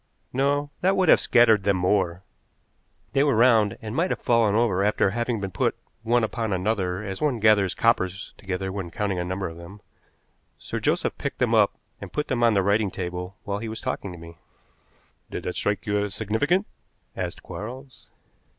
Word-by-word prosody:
"No, 145 +2 +1
that 190 +2 +2
would 185 -4 +3
have - - +7
scattered 115 -4 +5
them 100 0 +1
more. 90 -1 +1 0.9
They 135 - +3
were 145 -4 +2
round, 110 -3 +4
and 110 +1 -5
might 175 +5 +1
have - - -2
fallen 115 -3 +2
over 105 -5 +2
after 100 -1 +2
having 120 +1 -1
been 100 -1 -4
put - - 0 0.3
one 120 +1 +2
upon 110 0 -2
another 95 0 -1
as 95 -2 -5
one 145 -6 +1
gathers 105 -4 +4
coppers 100 -4 0
together 95 0 -4
when 95 -3 -5
counting 100 0 -2
a - - -1
number 95 +2 -3
of 80 0 -9
them. 85 +4 -11 0.8
Sir - - -5
Joseph - - 0
picked - - -4
them - - +1
up - - +4 0.3
and - - -8
put 150 - -3
them 130 -3 0
on 115 -2 +4
the 100 - +3
writing 100 +1 +2
table 90 +1 -5
while 100 0 -3
he 115 +1 -5
was 110 - -6
talking 100 - -4
to 90 - -9
me." 85 0 -12 0.9
"Did - - -5
that 90 - -4
strike 100 +2 -1
you 105 -1 +1
as 100 -2 -4
significant?" 145 - +1 0.5
asked - - -5
Quarles. 130 +5 -9
105 Hz, 190 wpm, -25 LUFS, 95-120 Hz, 0.9 s, have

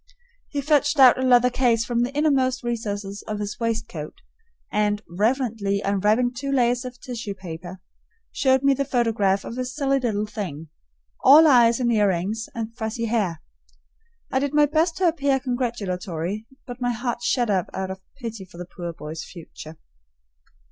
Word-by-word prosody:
He 285 - -2
fetched 290 +1 +2
out 260 -2 +7
a - - -1
leather 250 -1 +4
case 235 -3 +2
from 240 -1 0
the 245 +2 0
innermost 270 -4 +1
recesses 205 -4 -4
of 215 -1 -3
his 210 0 -5
waistcoat 225 -10 -3 0.6
and, 210 0 0
reverently 210 +1 0
unwrapping 210 +5 +1
two 275 +3 -4
layers 245 -2 +2
of 250 0 -8
tissue 235 -6 -6
paper, 180 0 -8 0.5
showed 265 0 +2
me 275 0 +5
the 275 +1 0
photograph 225 -7 +1
of 235 - -6
a - - 0
silly 275 +2 0
little 215 -4 -1
thing, 175 -8 -6 0.5
all 295 +5 +9
eyes 240 -5 +5
and 240 -2 +1
earrings 205 +1 0
and 230 0 -5
fuzzy 230 0 -3
hair. 205 -8 -1 0.9
I 265 - +2
did 285 +1 -2
my 295 0 +6
best 315 +3 +1
to 370 - +3
appear 285 -5 +1
congratulatory, 215 - -3 0.2
but 245 0 -9
my 245 0 +1
heart 240 +1 -3
shut 240 -2 +1
up 185 -1 +1
out 190 0 -4
of 190 0 -8 0.2
pity 225 -5 -6
for 185 -2 -15
the 180 - -6
poor 175 -1 -6
boy's 155 0 -7
future. 160 -2 -11
230 Hz, 165 wpm, -23 LUFS, 200-255 Hz, 0.9 s, all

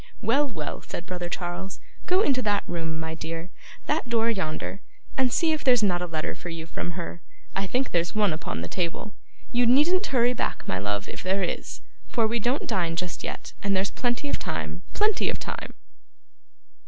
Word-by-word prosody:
'Well, 285 +1 +4
well,' 155 - -4
said 175 - -6
brother 180 -2 -3
Charles, 175 +2 -3 0.3
'go 365 +2 +5
into 270 -10 +3
that 205 -3 +2
room, 165 -2 -2
my 160 0 -3
dear 165 +2 -5 0.3
that - - +1
door 230 0 +3
yonder 190 0 -2 0.3
and 260 -2 +3
see 330 +4 +4
if 310 -1 0
there's 245 -4 +6
not 180 -3 +3
a 180 - -1
letter 155 -2 -1
for 175 - -7
you 165 -1 -5
from 170 +1 -3
her. 170 0 -5 0.3
I 195 0 0
think 255 +6 +1
there's 170 +2 +1
one 205 -5 +4
upon 155 - -3
the 85 - -3
table. 180 - -2 0.4
You 240 0 +4
needn't 335 - +5
hurry 245 -2 +4
back, - - -2
my 95 - 0
love, 100 +1 -1
if - - -6
there 190 +2 +1
is, 175 - -3 0.3
for 230 - +3
we 230 +2 +1
don't 245 +6 +1
dine 170 -3 +1
just 180 +1 -3
yet, - - -5
and 200 -1 +2
there's 190 +1 +1
plenty 245 +3 0
of - - 0
time. - - -3
Plenty 425 0 +3
of - - 0
time. - - -5
195 Hz, 195 wpm, -27 LUFS, 170-245 Hz, 0.4 s, there's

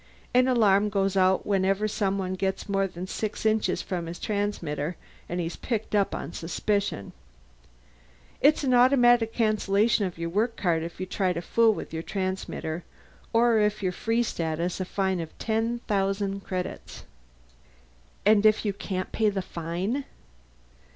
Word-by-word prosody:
An 250 +1 +5
alarm 210 -5 +4
goes 195 -1 0
out 190 0 +3
whenever 195 +1 +1
someone 195 -3 -1
gets 190 +2 -2
more 195 -1 +1
than 180 0 -7
six 215 +3 -4
inches 215 -4 +1
from 175 -3 -3
his 170 +1 -6
transmitter, 180 -7 -2 0.3
and 175 - -2
he's 170 0 -3
picked 220 -4 -3
up 200 -2 +2
on 155 - -6
suspicion. 195 - -2 1.3
It's 300 +2 +4
an 260 -2 +2
automatic 245 -2 +5
cancellation 215 -1 +2
of 180 -2 -5
your 170 0 -3
work 220 +6 0
card 170 -4 +1
if 170 +2 -7
you 185 - -2
try 185 0 0
to 170 - -3
fool 225 +3 +3
with - - -7
your 160 - -2
transmitter 185 -3 -3 0.5
or 230 -1 +4
if 210 0 +1
you're 185 - +1
Free 225 +6 0
Status 170 -3 -2
a 185 - -1
fine 190 -1 -1
of 165 -1 -7
ten 230 +1 -1
thousand 195 0 0
credits." 185 -1 -5 1.2
"And 210 0 +5
if 215 0 +4
you 205 - +1
can't 185 -1 -4
pay 220 -1 +2
the 195 -2 -2
fine?" 180 - -3
195 Hz, 155 wpm, -27 LUFS, 180-220 Hz, 1.3 s, An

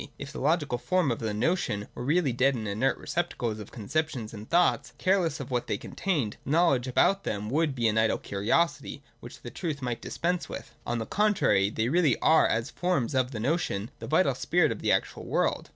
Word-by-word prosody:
If 140 0 -7
the - - -6
logical 150 -4 +1
forms 145 +4 +1
of - - -7
the 110 -1 -2
notion 105 - -1
were - - -6
really 150 0 +2
dead 130 +3 +2
and 110 -3 -4
inert 110 +7 0
receptacles 120 -10 -2
of 105 - -9
conceptions 125 0 -3
and 105 0 -9
thoughts, 175 +1 +2
careless 180 -5 +1
of 135 -2 -7
what 125 -1 -1
they - - -1
contained, 150 - -2
know 165 +5 +3
ledge 130 -3 0
about 195 +10 +2
them 105 +1 -3
would 150 -1 +1
be 120 -3 +1
an 110 0 +2
idle 110 0 +2
curiosity 140 +8 -1 0.2
which 120 - -12
the 120 - -7
truth 155 +1 -4
might 125 -3 -3
dispense 175 +1 -2
with. - - -8
On 120 - -1
the 115 - -3
contrary 175 - +2
they 110 +1 -1
really 155 -4 +3
are, 160 - +4
as 115 +5 -1
forms 175 -8 -1
of 130 -1 +1
the 120 -5 -6
notion, 115 - -1
the - - -7
vital - - +3
spirit - - +2
of - - -4
the - - +1
actual - - 0
world. - - 0
130 Hz, 210 wpm, -28 LUFS, 115-165 Hz, 0.2 s, are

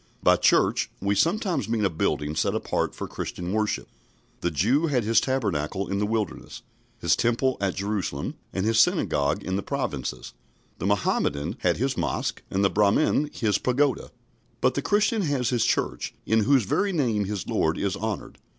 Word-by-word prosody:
By - - +6
"church," - - +3
we 100 +1 0
sometimes 170 - +1
mean 110 -2 +1
a - - +3
building 75 -1 -1
set - - 0
apart - - -1
for - - -5
Christian 90 +2 -5
worship. 105 -1 -1 0.5
The 85 - 0
Jew 120 - +2
had 130 -6 +1
his 115 +2 +3
Tabernacle 100 - -1
in 100 - -2
the 105 - 0
Wilderness, 110 -4 -3 0.4
his - - +3
Temple 125 +2 +1
at 95 -2 0
Jerusalem, 100 -7 -2 0.2
and 95 +1 -2
his 110 0 +3
Synagogue 70 -10 +2
in 95 0 -2
the - - -1
Provinces; 95 - -4 0.5
the - - -1
Mohammedan 70 +2 0
has 90 -1 +1
his 135 +3 -1
Mosque, 80 -6 -2
and 100 +1 +1
the - - +4
Brahmin 105 +8 +2
his 105 -4 0
Pagoda; 130 +2 +1 0.5
but - - +2
the - - -1
Christian 210 +2 +2
has 140 -8 0
his 120 -3 +2
Church, - - -1
in 110 -1 +2
whose 135 -2 +4
very 200 - 0
name 120 - +1
his 100 -2 -4
Lord 80 0 +1
is 100 -2 -1
honoured. 110 -2 -5
105 Hz, 175 wpm, -25 LUFS, 95-130 Hz, 0.5 s, By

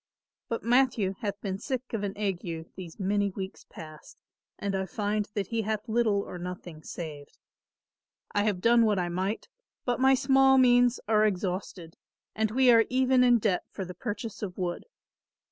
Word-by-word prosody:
But 230 - -3
Matthew 240 -5 +2
hath 205 -1 -3
been 195 -2 -3
sick 255 +1 -4
of 225 - -1
an 200 0 -4
ague 175 -5 -4
these 175 -2 -9
many 200 +1 +1
weeks 190 0 -7
past 155 -1 -12 0.4
and 200 -1 -3
I 190 0 -2
find 210 +1 -2
that 200 -2 -2
he 230 -1 0
hath 215 +1 -3
little 220 -3 +2
or 180 - -8
nothing 175 -3 -7
saved. 150 -4 -8 0.9
I 205 0 +1
have 200 -4 0
done 235 +2 +5
what 210 -2 +2
I 175 -1 -1
might 190 +5 -2 0.4
but 245 -1 0
my 265 +1 +5
small 270 0 +4
means 245 -1 +5
are 215 -1 +4
exhausted, 180 -3 -4 0.4
and 220 0 +1
we 255 +3 +4
are 230 -1 +6
even 255 0 +3
in 245 -1 +6
debt 205 -5 +1
for 190 - -6
the 180 - -8
purchase 210 +2 -5
of 190 -4 -5
wood. 175 - -3
205 Hz, 175 wpm, -28 LUFS, 185-235 Hz, 0.9 s, are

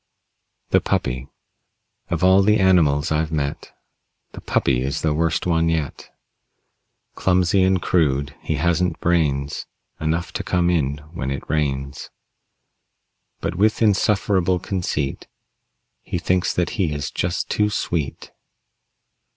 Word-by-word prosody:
THE - - +4
PUPPY 65 +2 -1 0.8
Of 85 +1 -1
all 95 +1 +6
the 105 +2 +4
animals 80 -7 +3
I've 80 +1 0
met 70 -3 -3 0.6
The - - -10
Puppy 65 -2 +1
is 70 +2 -2
the 80 -2 +2
worst 80 0 0
one 80 -1 +2
yet. 80 -4 -3 1.0
Clumsy 90 +1 +2
and 95 0 +3
crude, 70 -5 +1
he 80 - -2
hasn't 85 +3 0
brains 75 -5 0 0.3
Enough 80 +2 -2
to - - -3
come 90 -1 +1
in 70 -4 0 0.2
when 65 -6 -3
it 70 -1 -4
rains. 70 -2 -2 1.3
But 85 - -2
with 105 +5 +2
insufferable 100 -3 +2
conceit 85 -7 -3 0.7
He - - -4
thinks 90 +2 +1
that 90 -1 -1
he 85 -5 +1
is 70 -1 -4
just 85 0 -2
too 105 0 +2
sweet. 85 -8 -3
80 Hz, 125 wpm, -22 LUFS, 70-90 Hz, 1.3 s, all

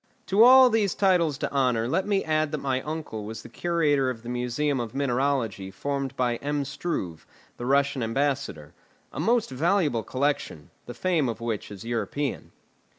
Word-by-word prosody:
To 200 +4 +5
all 255 0 +8
these 215 -4 +1
titles 175 -7 +2
to - - -3
honour 125 -5 +1
let 190 +10 0
me 200 -2 +1
add 155 -1 0
that - - 0
my 130 -2 -1
uncle 150 -8 -5
was 110 +1 -7
the - - -11
curator 145 -2 +1
of 115 -3 -6
the 120 - -7
museum 125 +3 -1
of 115 -2 -5
mineralogy 130 -7 0
formed 140 +6 -3
by 120 -2 0
M. 145 +1 -2
Struve, 100 - -4 0.3
the 120 - -5
Russian 140 0 +2
ambassador; 115 - -2 0.4
a - - -6
most 225 - +1
valuable 150 - +1
collection, 130 - -2 0.2
the 120 - -7
fame 165 -4 +1
of 115 - -4
which 115 -3 -3
is 105 +1 -9
European. 120 +4 -3
140 Hz, 170 wpm, -26 LUFS, 120-155 Hz, 0.4 s, all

